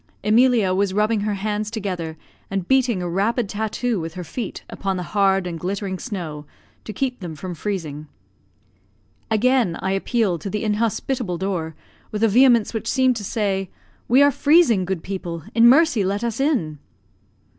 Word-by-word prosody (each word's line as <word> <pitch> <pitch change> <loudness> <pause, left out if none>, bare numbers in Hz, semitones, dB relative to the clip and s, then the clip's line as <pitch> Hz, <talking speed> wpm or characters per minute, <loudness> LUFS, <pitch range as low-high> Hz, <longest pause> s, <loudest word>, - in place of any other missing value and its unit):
Emilia 225 -3 +4
was 195 0 0
rubbing 215 +1 +2
her 205 0 -1
hands 210 +1 -2
together, 185 -7 -4 0.3
and 195 -2 -3
beating 250 -8 +2
a - - -2
rapid 205 +6 0
tattoo 220 +2 -2
with 165 -1 -6
her 180 - -5
feet 205 - -6
upon 195 -2 -3
the 180 - -3
hard 195 -2 +3
and 170 -2 -5
glittering 190 +1 -3
snow, 170 - -5 0.4
to - - -6
keep 250 +4 -2
them 175 -5 -6
from 180 +3 -6
freezing. 160 -6 -4 1.2
Again 225 -4 +2
I 190 - -2
appealed 195 -3 0
to 195 - -4
the 210 +2 -3
inhospitable 220 -1 -1
door, 170 -4 -3 0.4
with 215 +1 -2
a - - +6
vehemence 240 0 +4
which 220 -1 -4
seemed 260 -2 +3
to 210 - -5
say, 195 -3 -1 0.4
"We 260 +4 +6
are 285 - +5
freezing, 285 - +4
good 180 -3 -3
people; 175 -4 -5
in 230 0 +6
mercy 295 -5 +4
let 200 +4 -1
us 235 0 -2
in!" 225 - 0
205 Hz, 165 wpm, -22 LUFS, 185-230 Hz, 1.2 s, a